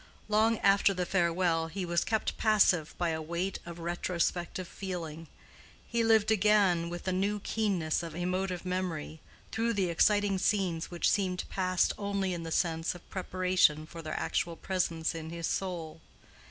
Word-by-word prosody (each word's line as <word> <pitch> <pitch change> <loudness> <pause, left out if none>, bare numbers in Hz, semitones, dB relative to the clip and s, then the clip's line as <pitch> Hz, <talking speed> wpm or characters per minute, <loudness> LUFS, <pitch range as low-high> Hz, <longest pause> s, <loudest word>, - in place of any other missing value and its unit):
Long 220 +2 +3
after 195 0 +4
the 180 0 -1
farewell 170 -2 +1
he 180 +3 -4
was 170 0 +1
kept 220 -1 -1
passive 190 -7 +3
by 175 -1 0
a 160 -1 -2
weight 170 +4 -3
of 170 -1 -7
retrospective 175 +1 -2
feeling. 165 -5 -6 0.6
He 235 0 0
lived 220 -1 +4
again, 200 -5 +3
with 175 0 -6
the 185 - -1
new 200 +3 0
keenness 190 -9 0
of 165 -2 -7
emotive 180 +1 -2
memory, 180 -4 -3 0.3
through 230 +1 0
the 195 -4 0
exciting 205 +2 +3
scenes 185 -5 0
which 175 -1 0
seemed 185 -3 +1
past 185 -1 +1
only 200 -2 -1
in 170 - -4
the 165 0 -6
sense 165 0 0
of 175 - -13
preparation 185 -4 +2
for 165 +1 -9
their 155 -1 -4
actual 170 -1 -1
presence 170 -3 -1
in 160 -1 -6
his 170 0 -4
soul. 165 -4 -3
180 Hz, 160 wpm, -30 LUFS, 165-195 Hz, 0.6 s, after